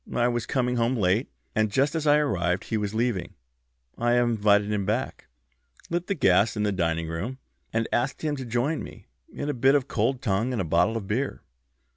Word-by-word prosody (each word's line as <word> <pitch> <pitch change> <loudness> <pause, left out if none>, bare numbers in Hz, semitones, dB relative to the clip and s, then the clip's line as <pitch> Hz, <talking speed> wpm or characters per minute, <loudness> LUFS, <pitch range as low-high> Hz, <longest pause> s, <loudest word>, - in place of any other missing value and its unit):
I 120 0 +3
was 120 -2 -2
coming 125 -2 0
home 120 +2 +1
late, 105 +3 +1 0.2
and 110 -1 +1
just 135 +6 +2
as 160 -2 -1
I 145 0 +6
arrived 95 - 0
he - - -3
was 105 0 -2
leaving. 110 -7 -1 0.6
I 120 +1 +2
invited 105 -4 +3
him 105 -1 0
back, 110 +7 -2 0.6
lit 175 +1 -1
the 200 - 0
gas 100 - +3
in 105 - 0
the 105 - +1
dining 85 -3 -1
room, 95 +11 -4 0.3
and 115 0 0
asked 130 +6 -1
him 150 -2 0
to 130 - -5
join 125 +7 0
me - - -10 0.3
in 145 - -5
a 145 - 0
bit 135 +2 +4
of 140 -2 +1
cold 130 +2 0
tongue 110 +2 0
and 120 - -2
a 95 - 0
bottle 90 +8 +2
of 105 - -5
beer. 130 +7 -2
115 Hz, 205 wpm, -26 LUFS, 100-130 Hz, 0.6 s, I